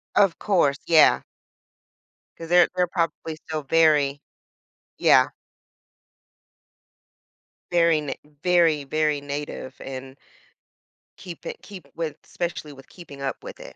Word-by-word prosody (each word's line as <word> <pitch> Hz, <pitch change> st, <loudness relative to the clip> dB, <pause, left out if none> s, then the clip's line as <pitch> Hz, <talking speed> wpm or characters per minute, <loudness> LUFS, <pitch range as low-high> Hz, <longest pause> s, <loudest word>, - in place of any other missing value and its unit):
Of 195 Hz, -4 st, +4 dB
course, 165 Hz, -9 st, +2 dB
yeah. 160 Hz, -2 st, +6 dB, 1.2 s
'Cause 165 Hz, 0 st, -9 dB
they're 175 Hz, 0 st, +6 dB
they're 180 Hz, -1 st, +2 dB
probably 165 Hz, -2 st, -2 dB
still 155 Hz, -1 st, -6 dB
very 145 Hz, -2 st, +3 dB, 0.8 s
Yeah. -, -, +5 dB, 2.4 s
Very 170 Hz, -2 st, +4 dB
n 150 Hz, -2 st, -3 dB, 0.3 s
very, 165 Hz, -5 st, +3 dB
very 150 Hz, 0 st, 0 dB
native 145 Hz, -2 st, -6 dB
and 130 Hz, 0 st, -8 dB, 1.0 s
keep 175 Hz, -3 st, -10 dB
it -, -, -7 dB
keep 185 Hz, -8 st, -11 dB
with 160 Hz, -3 st, -3 dB
especially 170 Hz, -4 st, -5 dB
with 135 Hz, -1 st, -14 dB
keeping 145 Hz, -6 st, -12 dB
up 135 Hz, -, -4 dB
with -, -, -9 dB
it. -, -, -11 dB
155 Hz, 115 wpm, -24 LUFS, 140-170 Hz, 2.4 s, yeah